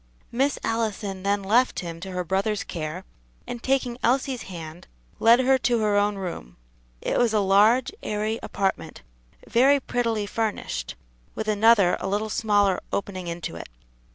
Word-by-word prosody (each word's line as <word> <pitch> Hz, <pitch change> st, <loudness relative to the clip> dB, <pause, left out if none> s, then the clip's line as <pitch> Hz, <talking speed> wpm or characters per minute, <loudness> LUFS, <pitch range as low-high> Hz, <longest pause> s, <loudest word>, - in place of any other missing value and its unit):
Miss 270 Hz, +4 st, +1 dB
Allison 215 Hz, -4 st, -2 dB
then 200 Hz, +1 st, 0 dB
left 220 Hz, -1 st, +2 dB
him 165 Hz, -2 st, -7 dB
to 190 Hz, +3 st, -7 dB
her 180 Hz, -1 st, -3 dB
brother's 195 Hz, +4 st, -1 dB
care, 155 Hz, -3 st, -5 dB, 0.4 s
and 240 Hz, -, -6 dB
taking 255 Hz, -2 st, 0 dB
Elsie's 255 Hz, 0 st, +1 dB
hand, 165 Hz, -2 st, -9 dB, 0.3 s
led 235 Hz, +2 st, +6 dB
her 265 Hz, +1 st, +3 dB
to 245 Hz, -1 st, +1 dB
her 210 Hz, -1 st, +2 dB
own 205 Hz, 0 st, +2 dB
room. 175 Hz, -, -7 dB, 0.4 s
It -, -, 0 dB
was 230 Hz, -3 st, +2 dB
a -, -, +4 dB
large, 210 Hz, -, +4 dB
airy 215 Hz, +2 st, -2 dB
apartment, 195 Hz, -1 st, -3 dB, 0.4 s
very 275 Hz, +4 st, +4 dB
prettily 230 Hz, -5 st, -1 dB
furnished, 220 Hz, +1 st, -3 dB, 0.4 s
with 220 Hz, -, -4 dB
another 210 Hz, -3 st, +4 dB
a -, -, -4 dB
little 210 Hz, +2 st, -1 dB
smaller 205 Hz, -4 st, +2 dB
opening 185 Hz, -3 st, -3 dB
into 170 Hz, -, -5 dB
it. 85 Hz, -, -8 dB
210 Hz, 155 wpm, -25 LUFS, 190-235 Hz, 0.4 s, led